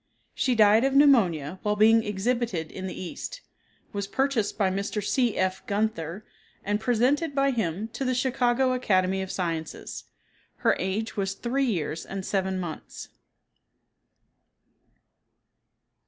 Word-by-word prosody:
She 255 -2 +1
died 215 +1 +6
of 270 0 +1
pneumonia 190 - +4
while 210 -1 0
being 225 +2 +5
exhibited 210 -5 -1
in 190 0 -6
the 185 - -6
East, - - -6 0.5
was 200 -1 -3
purchased 265 -3 0
by 195 -3 +2
Mr. 200 +2 -2
C. 245 -1 +1
F. 185 0 0
Gunther 200 -3 -2 0.4
and 205 +1 0
presented 255 +7 +1
by 275 0 +3
him 210 -3 -2
to 245 +4 -5
the 255 -1 0
Chicago 255 0 +2
Academy 190 -6 +1
of 190 - -4
Sciences. 165 -3 -4 0.6
Her - - +5
age 200 +5 -2
was 195 -1 -1
three 265 +6 0
years 165 - -2
and 195 -1 -6
seven 190 -1 -1
months. 170 -4 -7
210 Hz, 130 wpm, -26 LUFS, 190-250 Hz, 0.6 s, died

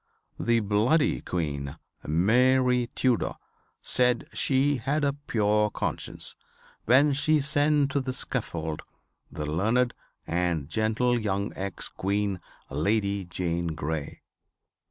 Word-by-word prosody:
The 115 -1 +2
Bloody 110 +9 +2
Queen, 70 -5 -3 0.3
Mary 125 - +3
Tudor, 125 -4 +1 0.5
said 125 -1 +2
she 140 +1 +2
had 140 +6 -1
a 140 -1 +2
pure 105 -7 +1
conscience - - -2 0.5
when 140 +5 +5
she 155 +2 +3
sent 145 0 +2
to 140 - +1
the 130 0 -3
scaffold 85 - -3 0.5
the 75 - -4
learned 110 +11 +1 0.3
and 85 -4 -1
gentle 110 +6 +1
young 100 -2 -2
Ex 100 +1 -3
Queen 100 0 -1 0.3
Lady 100 +6 0
Jane 85 -1 -2
Grey. 75 -1 -4
110 Hz, 110 wpm, -27 LUFS, 90-130 Hz, 0.5 s, when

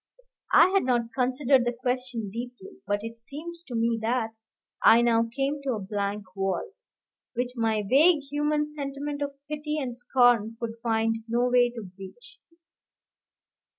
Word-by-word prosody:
I - - +7
had 390 0 +3
not 240 -2 0
considered 260 0 +2
the 240 0 -1
question 250 -4 -2
deeply, 250 - -8
but 205 0 -1
it 230 0 -7
seemed 300 +8 -7
to 245 - -5
me 230 0 +1
that 230 0 0 0.5
I 235 +1 +7
now 230 -1 +3
came 275 +3 -1
to 270 -2 -1
a - - -4
blank 200 -1 -4
wall, 195 - -2 0.6
which 245 +1 -1
my 220 -3 0
vague 300 - +5
human 300 +1 +1
sentiment 290 -1 -5
of 280 -1 -3
pity 300 0 -3
and 255 -5 -3
scorn 240 -3 +3
could 230 -1 -4
find 225 -1 +1
no 240 +2 +1
way 245 -1 +4
to 235 -2 -8
breach. 195 - -12
245 Hz, 150 wpm, -27 LUFS, 225-285 Hz, 0.6 s, I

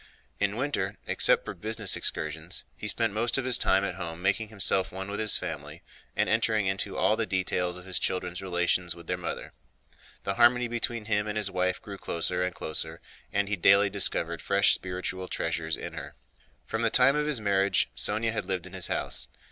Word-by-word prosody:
In - - 0
winter, - - -2
except - - +4
for - - -5
business 110 -2 +1
excursions, 80 +3 -1
he 105 - -6
spent 115 0 +2
most 115 +4 +1
of 135 - -1
his 130 -2 +5
time 95 +1 +3
at 100 - -2
home 85 -3 -6
making 100 +4 0
himself 95 -3 +1
one 95 +2 -6
with 105 - -3
his 110 -2 +3
family - - -6 0.3
and - - +1
entering 110 -2 +2
into 95 0 -1
all - - +3
the - - -2
details 90 -1 0
of 90 - -10
his 95 -2 0
children's 90 -1 -2
relations 90 -1 0
with 85 -1 -12
their 90 - -1
mother. 85 -2 -5 0.7
The 100 - -1
harmony 120 +2 +4
between 115 -1 -3
him 105 -1 0
and 105 0 -3
his 105 -2 -1
wife 90 0 0
grew 100 -2 -9
closer 90 +2 -1
and 90 -1 -2
closer 80 0 -4 0.3
and 100 0 0
he 105 - -1
daily 100 +2 +4
discovered 85 -4 0
fresh 100 0 +4
spiritual 90 0 -4
treasures 80 -2 -2
in - - -6
her. - - -8 0.5
From 110 - -3
the 115 - +3
time 130 +4 +5
of 150 0 0
his 150 -5 +1
marriage 100 -1 +2
Sónya 110 +2 +1
had 110 - -3
lived 95 -2 -2
in 95 - -11
his 95 -2 0
house. - - 0
95 Hz, 200 wpm, -28 LUFS, 90-110 Hz, 0.7 s, his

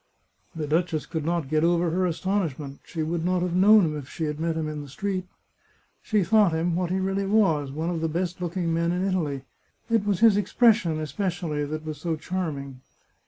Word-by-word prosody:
The 155 -2 -3
duchess 160 -1 0
could 160 -2 -4
not 170 -2 -1
get 155 +2 +1
over 170 0 +2
her 185 +2 +1
astonishment; 165 -6 -2
she 160 -2 -4
would 165 +1 -2
not 180 0 +1
have 180 -1 -1
known 200 +2 +6
him 155 -1 -2
if 140 -3 -7
she 165 - -5
had 150 -1 -2
met 165 0 -1
him 160 -1 -2
in 150 -1 -4
the 145 - -9
street. 185 +5 -3 0.7
She 210 -3 +1
thought 210 -2 +4
him, 165 +1 0
what 180 -1 -1
he 190 +1 0
really 195 +1 -1
was, 165 -10 +2
one 160 +5 -2
of 165 -2 -3
the 160 - 0
best 175 +2 -2
look 175 +1 -3
ing 170 -2 0
men 170 +1 +1
in 180 +2 0
Italy. 150 -8 -1 0.5
It 225 -3 +3
was 205 -1 0
his 225 -3 +6
expression, 205 -5 +3
especially, 155 -1 -2
that 155 +2 -5
was 155 -2 -5
so 165 -1 -1
charming. 150 -6 -4
170 Hz, 210 wpm, -25 LUFS, 155-185 Hz, 0.7 s, known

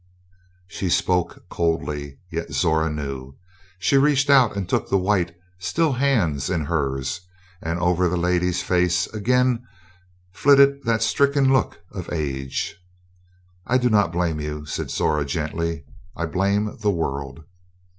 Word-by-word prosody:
She 95 -1 -3
spoke 90 0 0
coldly, 75 -4 -2
yet 85 -2 -4
Zora 80 +2 +2
knew. 70 -3 -5 0.4
She 115 +9 +2
reached 145 0 +3
out 130 -7 +5
and 95 -3 -2
took - - -1
the 100 - +3
white, 90 -3 0 0.2
still 145 - +1
hands 110 - +1
in 80 -5 -1
hers, 70 0 -2 0.4
and 80 +1 -2
over 90 0 +2
the 90 - -1
lady's 90 0 +1
face 90 -1 +2
again 125 +2 +1 0.7
flitted 140 +5 +5
that 115 -1 +1
stricken 140 +3 +3
look 130 -9 0
of 90 -3 -7
age. 70 +3 -3 0.9
"I 130 - +3
do 125 -1 +1
not 105 -5 +3
blame 85 -3 -1
you," 75 0 -5
said 75 - -4
Zora 75 -2 +1
gently. 80 +1 -3 0.3
"I 85 - -2
blame 100 +5 0
the 105 -1 +1
world." 70 -4 -3
90 Hz, 135 wpm, -23 LUFS, 80-110 Hz, 0.9 s, out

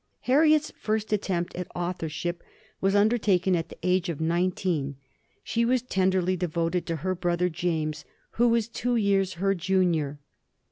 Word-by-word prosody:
Harriet's 305 +3 +3
first 215 0 -1
attempt 185 -4 -1
at 180 -1 -4
authorship 175 -1 -3 0.4
was 195 +1 +2
undertaken 205 -4 +3
at 165 -1 -2
the - - -11
age 180 0 +1
of 165 - -4
nineteen; 170 -3 0 0.5
she 235 - 0
was 250 +1 +2
tenderly 185 -4 +1
devoted 170 0 -1
to 165 - -1
her 185 - +1
brother 175 0 0
James, 155 -3 -2 0.3
who 240 +1 +2
was 230 -2 +2
two 245 +1 -1
years 195 -4 +2
her 195 +3 +1
junior. 175 -6 +1
185 Hz, 145 wpm, -27 LUFS, 170-205 Hz, 0.5 s, Harriet's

